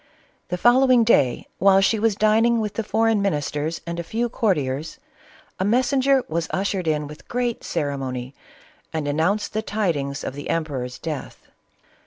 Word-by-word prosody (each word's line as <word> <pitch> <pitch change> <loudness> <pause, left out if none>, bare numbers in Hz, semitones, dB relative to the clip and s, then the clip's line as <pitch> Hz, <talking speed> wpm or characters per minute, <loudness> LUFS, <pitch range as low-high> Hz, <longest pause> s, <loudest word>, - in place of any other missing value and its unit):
The 180 - -3
following 250 +3 +5
day 135 - +3
while 195 0 +6
she 210 +3 +2
was 220 -1 +2
dining 225 +3 +3
with 210 -2 -2
the 225 - -2
foreign 220 0 +2
ministers 150 -3 -2
and 170 0 -4
a - - -3
few 235 +7 -2
courtiers, 155 - -1 0.6
a - - +1
messenger 260 +4 +2
was 165 +1 -2
ushered 195 -2 -1
in 150 -1 0
with 150 +1 -12
great 245 -1 -2
ceremony 130 -3 -3 0.6
and 155 -2 -3
announced 165 +9 0
the 215 - 0
tidings 165 -11 -2
of - - -4
the 145 +1 -7
emperor's 135 -6 -2
death. 155 -4 -6
190 Hz, 155 wpm, -23 LUFS, 150-225 Hz, 0.6 s, while